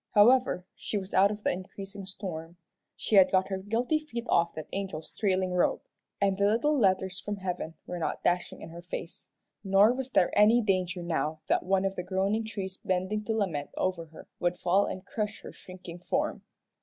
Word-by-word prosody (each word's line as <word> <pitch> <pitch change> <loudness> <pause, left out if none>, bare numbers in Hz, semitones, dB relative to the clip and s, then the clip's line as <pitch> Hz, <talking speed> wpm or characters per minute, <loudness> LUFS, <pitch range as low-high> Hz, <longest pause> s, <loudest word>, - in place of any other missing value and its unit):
However, 235 -3 +5
she 210 - -4
was 195 -1 -5
out 195 +2 +6
of 210 0 -6
the - - +2
increasing 195 +2 -7
storm. 175 -3 -6 0.4
She 215 - +1
had 190 - +7
got 190 0 +2
her 190 -1 -2
guilty 230 +10 0
feet 240 -6 -6
off 170 0 +2
that 155 -1 -6
angel's 190 -5 -4
trailing 185 -3 0
robe, 180 - +2 0.4
and 195 -1 +1
the 200 - +4
little 235 +8 +2
letters 190 -5 +2
from 205 +2 -4
heaven 180 -4 -4
were 180 - -5
not 165 - -3
dashing 175 0 0
in - - -8
her 170 +1 -9
face, 175 0 -7 0.3
nor 200 +3 +5
was 265 0 -4
there 190 -8 +2
any 215 +3 +6
danger 185 -4 0
now 160 -2 -2
that - - +3
one 190 +1 +1
of 195 0 -1
the - - -2
groaning 195 +4 0
trees 195 -3 -5
bending 190 +3 -1
to 225 - 0
lament 160 -9 -1
over 185 -3 -1
her 160 - -13
would 175 0 0
fall 185 +3 +2
and 185 - -6
crush 210 0 -3
her - - -9
shrinking 180 -2 -11
form. 180 - -1
190 Hz, 195 wpm, -29 LUFS, 180-205 Hz, 0.4 s, had